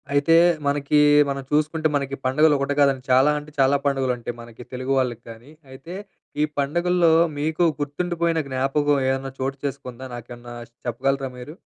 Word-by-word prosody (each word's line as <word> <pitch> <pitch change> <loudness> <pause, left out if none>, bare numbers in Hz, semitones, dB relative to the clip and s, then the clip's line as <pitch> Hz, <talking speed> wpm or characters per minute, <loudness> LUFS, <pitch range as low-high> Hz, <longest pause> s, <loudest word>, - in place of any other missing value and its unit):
అయితే, 145 +3 +4 0.3
మనకీ 145 +1 +2 0.3
మనం 135 0 -3
చూసుకుంటే 155 +1 +1
మనకి 140 -1 -2
పండుగలొకటి 145 +1 +2
కాదండి. 135 -2 +3
చాలా 130 +3 +5
అంటే 150 +1 -13
చాలా 135 +1 +4
పండుగలుంటాయి 130 -4 -1
మనకి, 115 0 -12
తెలుగు 130 +1 -2
వాళ్ళకి 120 -2 -2
కానీ. 115 +5 -12 0.2
అయితే, 135 +7 -10 0.5
ఈ - - +4 0.2
పండుగల్లో 170 +3 +2 0.3
మీకు 160 +3 0 0.2
గుర్తుండిపోయిన 170 +2 -1
జ్ఞాపకం 135 +2 +1
ఏదన్నా 135 0 -2
చోటు 135 +1 -2
చేసుకుందా? 130 -2 -6
నాకేవన్నా 120 0 -10 0.3
చెప్పగలరా 135 +3 -1
మీరు? 125 +6 -9
140 Hz, 140 wpm, -23 LUFS, 130-150 Hz, 0.5 s, చాలా